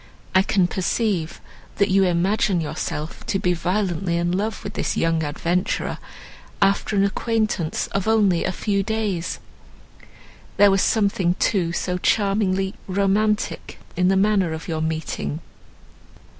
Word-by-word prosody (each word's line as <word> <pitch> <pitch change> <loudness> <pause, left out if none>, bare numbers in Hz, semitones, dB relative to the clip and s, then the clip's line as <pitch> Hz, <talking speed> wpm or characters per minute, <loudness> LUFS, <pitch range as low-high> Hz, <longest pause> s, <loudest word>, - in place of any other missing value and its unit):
I 190 - +6
can 190 -1 +2
perceive, 185 -1 -1 0.4
that 200 -1 +2
you 195 0 +4
imagine 185 +2 +1
yourself 155 0 -4
to 195 - +1
be 180 -2 +1
violently 175 -1 -1
in 175 0 0
love 205 +4 -2
with 200 - -6
this - - -2
young 165 -1 +1
adventurer, 170 +5 -1 0.6
after 200 +1 +2
an 195 - +3
acquaintance 215 -5 -1
of 195 +1 -2
only 205 -6 +3
a 185 - 0
few 200 +1 -1
days. 205 -5 -2 1.2
There 205 -1 +6
was 195 0 +3
something, 195 -5 +1
too, 185 -4 +1
so 180 +1 -2
charmingly 195 -1 +1
romantic 200 +2 0 0.2
in 180 - +2
the 190 +1 +3
manner 195 -4 +2
of 160 - -7
your 160 -2 -2
meeting!" 155 - -3
190 Hz, 135 wpm, -22 LUFS, 175-205 Hz, 1.2 s, I